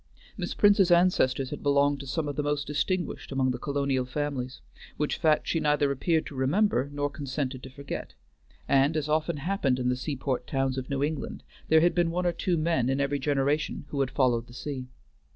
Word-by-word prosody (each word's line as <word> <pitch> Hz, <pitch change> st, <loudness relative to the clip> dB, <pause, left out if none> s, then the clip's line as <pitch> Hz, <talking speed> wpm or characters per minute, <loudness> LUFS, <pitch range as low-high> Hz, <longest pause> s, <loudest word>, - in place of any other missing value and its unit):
Miss -, -, -4 dB
Prince's 205 Hz, -3 st, +5 dB
ancestors 170 Hz, -7 st, +3 dB
had -, -, -5 dB
belonged 140 Hz, 0 st, +2 dB
to 140 Hz, -, -8 dB
some 150 Hz, +3 st, -2 dB
of 145 Hz, -, -3 dB
the 150 Hz, -, 0 dB
most 145 Hz, 0 st, -1 dB
distinguished 165 Hz, +4 st, -2 dB
among 130 Hz, -1 st, +1 dB
the 125 Hz, -, -4 dB
colonial 140 Hz, -2 st, 0 dB
families, 130 Hz, -1 st, -3 dB, 0.4 s
which 150 Hz, -, 0 dB
fact 155 Hz, -2 st, +2 dB
she 165 Hz, -, +1 dB
neither 150 Hz, -2 st, +2 dB
appeared 160 Hz, +4 st, +1 dB
to -, -, -8 dB
remember 140 Hz, -, +1 dB
nor 145 Hz, 0 st, -1 dB
consented 140 Hz, -2 st, -4 dB
to 130 Hz, -, -9 dB
forget; 140 Hz, +2 st, -7 dB, 0.5 s
and, 140 Hz, +3 st, +3 dB
as 150 Hz, -1 st, -1 dB
often 155 Hz, +1 st, 0 dB
happened 145 Hz, -4 st, 0 dB
in 125 Hz, -1 st, 0 dB
the 125 Hz, -, +1 dB
seaport 130 Hz, -1 st, -3 dB
towns 135 Hz, -1 st, 0 dB
of 130 Hz, -, -8 dB
New 140 Hz, 0 st, 0 dB
England, 150 Hz, 0 st, -3 dB, 0.2 s
there 160 Hz, 0 st, +5 dB
had 175 Hz, +1 st, +4 dB
been 175 Hz, -1 st, +2 dB
one 180 Hz, +2 st, -1 dB
or 175 Hz, -, +2 dB
two 175 Hz, 0 st, 0 dB
men 155 Hz, -6 st, +1 dB
in 135 Hz, +1 st, 0 dB
every 140 Hz, 0 st, 0 dB
generation 145 Hz, +2 st, 0 dB
who 140 Hz, -, -3 dB
had 135 Hz, -2 st, +1 dB
followed 125 Hz, -4 st, +1 dB
the 120 Hz, -, -14 dB
sea. 130 Hz, -1 st, -5 dB
145 Hz, 205 wpm, -28 LUFS, 130-155 Hz, 0.5 s, Prince's